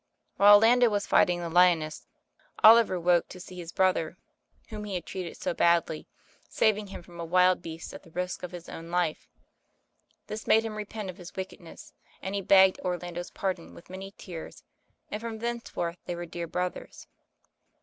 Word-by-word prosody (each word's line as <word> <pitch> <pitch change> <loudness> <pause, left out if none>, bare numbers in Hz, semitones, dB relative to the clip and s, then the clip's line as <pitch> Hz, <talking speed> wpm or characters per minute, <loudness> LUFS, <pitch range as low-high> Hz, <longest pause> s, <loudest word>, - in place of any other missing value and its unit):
While 205 +1 +9
Orlando 235 +3 +5
was 205 -1 -1
fighting 175 -1 +3
the 170 - -4
lioness, 170 -3 +3 0.6
Oliver 220 -4 +7
woke 175 0 +3
to 185 - -10
see 180 0 -10
his 170 -1 -7
brother, 185 -2 +1 0.5
whom 210 -2 -6
he 200 -2 -4
had 175 - -4
treated 185 -3 -6
so - - -2
badly, 170 -2 +1 0.4
saving 210 -1 +1
him 190 - -9
from 170 0 -14
a - - -3
wild 180 +2 +3
beast 165 -1 -8
at - - -10
he 170 - -17
risk 180 +2 -4
of 180 - -5
his 175 -1 -10
own 165 +1 -9
life. 175 -3 -1 1.0
This 215 +1 -7
made 225 +1 +4
him 220 - -4
repent 210 -2 -5
of 175 - -19
his 175 -2 -11
wicked 190 -1 -6
ness, 165 - -13 0.3
and 190 - -5
he 200 - -1
begged 190 0 +5
Orlando's 175 -1 -4
pardon 185 -4 -4
with 170 - -14
many 190 +1 -7
tears, 170 -4 -9 0.5
and 210 - -4
from 230 -1 -5
thenceforth 225 -7 -4
they 175 - -4
were 175 0 -5
dear 170 0 -6
brothers. 180 +2 -4
180 Hz, 180 wpm, -28 LUFS, 170-205 Hz, 1.0 s, While